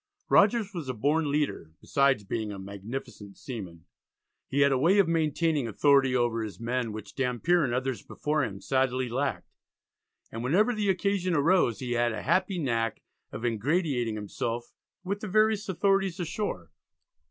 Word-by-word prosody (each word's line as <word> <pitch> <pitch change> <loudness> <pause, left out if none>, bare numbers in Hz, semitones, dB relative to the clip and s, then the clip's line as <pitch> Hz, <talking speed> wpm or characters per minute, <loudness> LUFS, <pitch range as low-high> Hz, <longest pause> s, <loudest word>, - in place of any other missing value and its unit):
Rogers 205 0 +4
was 165 -7 -5
a 130 - -2
born 145 +6 +1
leader, 140 - -1
besides 140 -6 +2
being 110 +1 -3
a 100 - -6
magnificent 100 +1 -8
seaman. 95 - -8 0.6
He 140 - 0
had 140 0 +5
a 135 - +3
way 175 +8 +4
of 200 -4 +5
maintaining 160 -3 +1
authority 135 +3 +3
over 120 -2 +1
his 110 -1 -6
men, 120 0 -2
which 105 -1 -8
Dampier 135 +6 +1
and 125 - 0
others 130 0 -2
before 150 0 -1
him 100 -5 -5
sadly 130 -1 0
lacked, 130 +4 -3 0.8
and 115 +1 -5
whenever 200 - +3
the 210 -3 -1
occasion 185 -1 +1
arose 150 - +2
he 125 -1 -4
had 120 -1 +1
a 110 - -5
happy 185 +5 +1
knack 115 -7 -1 0.3
of 115 - -5
ingratiating 120 - 0
himself 115 +3 -4 0.3
with 200 +2 -3
the 215 - -5
various 215 0 +2
authorities 195 -1 +1
ashore. 165 - -4
135 Hz, 160 wpm, -28 LUFS, 115-175 Hz, 0.8 s, had